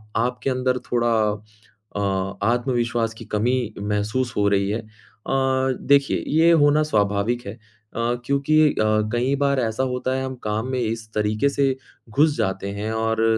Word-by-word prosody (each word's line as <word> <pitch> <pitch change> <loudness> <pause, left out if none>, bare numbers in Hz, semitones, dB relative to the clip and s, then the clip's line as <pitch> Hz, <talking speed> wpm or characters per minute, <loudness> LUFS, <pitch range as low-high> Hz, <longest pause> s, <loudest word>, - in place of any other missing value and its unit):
आपके 120 +1 0
अंदर 130 0 0
थोड़ा 120 -1 +2 0.8
अ, 95 -1 -1
आत्मविश्वास 120 -2 0
की 115 - -10
कमी 120 +5 0 0.2
महसूस 105 +4 -1
हो 100 0 +3
रही 100 0 +1
है। 110 +3 -1
अ, 110 - -19 0.9
देखिए, 140 0 +2
ये 165 +3 +4
होना 150 -1 +4
स्वाभाविक 105 -1 0
है, - - -5
अ, 115 - -17 0.7
क्योंकि 145 +3 +3
अ, 110 0 +1
कई 125 +3 +1
बार 140 -1 +2
ऐसा 115 +1 -1
होता 130 +1 -1
है, 130 - -2
हम 130 0 -5
काम 110 +3 -2
में 130 - -1
इस 110 -1 -3
तरीके 105 +5 +1
से 140 -1 +1 0.3
घुस 145 +6 +3
जाते 95 +1 -1
हैं 105 +2 -4
और 110 0 0
120 Hz, 155 wpm, -23 LUFS, 105-130 Hz, 0.9 s, ये